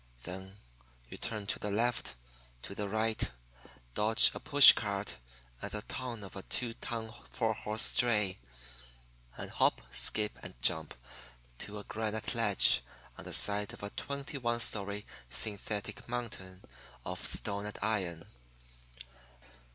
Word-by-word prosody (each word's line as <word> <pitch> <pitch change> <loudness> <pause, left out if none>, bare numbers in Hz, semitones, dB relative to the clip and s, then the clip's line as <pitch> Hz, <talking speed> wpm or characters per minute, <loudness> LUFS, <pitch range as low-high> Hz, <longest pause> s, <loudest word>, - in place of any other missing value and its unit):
Then 95 +2 -7 0.5
you - - -9
turn 110 -3 -4
to - - -1
the 105 - -2
left, 115 - 0 0.5
to - - -6
the 100 0 -3
right, 110 +1 0 0.6
dodge 110 - +5
a - - -5
push 145 -2 +10
cart 100 -1 -2 0.4
and - - -3
the 105 0 -4
tongue 120 -4 -5
of 95 - -9
a 95 - -5
two 120 +4 0
ton 115 -1 -5 0.2
four 110 0 0
horse 110 +1 -2
dray 105 -6 +2 1.0
and - - -6
hop, - - +3
skip, 105 -1 +1
and - - -10
jump 80 +5 +2 0.6
to 105 0 -4
a 105 - -6
granite 110 0 -2
ledge 105 - +5 0.3
on - - -10
the - - -6
side 105 +2 +5
of 120 - -11
a 100 - -4
twenty 140 0 -5
one 120 -1 0
story 105 -2 -2 0.2
synthetic 105 - -3
mountain 100 -6 -5 0.4
of - - -4
stone 100 0 -2
and 105 - -6
iron. 95 -7 -1
105 Hz, 140 wpm, -33 LUFS, 100-115 Hz, 1.0 s, push